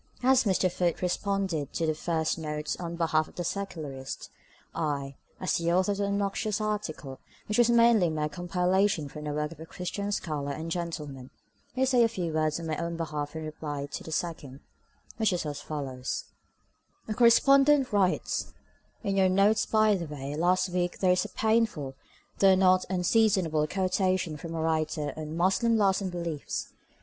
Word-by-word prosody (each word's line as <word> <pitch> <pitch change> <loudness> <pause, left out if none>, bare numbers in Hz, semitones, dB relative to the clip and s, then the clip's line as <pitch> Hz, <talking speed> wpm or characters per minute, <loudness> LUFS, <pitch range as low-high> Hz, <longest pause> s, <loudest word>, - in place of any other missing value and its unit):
As 260 0 +4
Mr. 185 -2 +2
Foote 175 -1 -1
responded 185 -5 -1
to 165 - 0
the 155 - +1
first 160 +1 -1
note 150 -1 -3
on 170 -1 -4
behalf 160 -2 +1
of - - -18
the 175 - -3
Secularist, 155 -9 -5 0.4
I, 145 -4 -2 0.3
as 185 - 0
the 170 0 0
author 185 +3 +2
of 200 - -3
the 200 - +1
obnoxious 200 +1 -1
article, 190 -11 -4 0.3
which 210 +2 0
was 240 -1 +5
mainly 230 -6 +5
mere 155 -1 -1
compilation 180 0 +1
from 150 +2 -8
the - - -2
work 150 +1 -2
of 165 - -12
a 160 - -8
Christian 200 +4 -4
scholar 150 -7 -2
and 160 +3 -5
gentleman, 150 -7 -5 0.5
may 260 +1 +2
say 255 -2 +3
a 230 - +6
few 180 -8 -3
words 155 0 0
on 165 - -6
my 155 -2 -2
own 170 0 -3
behalf 150 -2 -4
in 160 - -4
reply 150 -2 -5
to - - -5
the 160 - -8
second, 150 -5 -4 0.6
which 220 -2 +2
is 175 -3 -2
as 145 -1 -4
follows:— 135 -4 -4 0.8
"A 215 - -2
correspondent 275 +3 +5
writes:—In 195 0 -2
your 190 -1 +4
'Notes 200 +3 +3
by 215 -1 +4
the 180 -4 -2
Way' 145 -1 -5
last 180 +3 +2
week 175 0 -1
there 185 -2 +3
is 180 - +2
a - - -6
painful, 220 -12 0 0.5
though 195 -1 +6
not 185 -1 +4
unseasonable, 185 -4 +2
quotation 185 -2 0
from 165 +2 -7
a 160 - -2
writer 155 -2 -1
on 155 +1 -6
'Muslim 210 +6 +3
Laws 195 -2 +3
and 190 - -2
Beliefs. 170 -4 -4
175 Hz, 175 wpm, -28 LUFS, 155-200 Hz, 0.8 s, a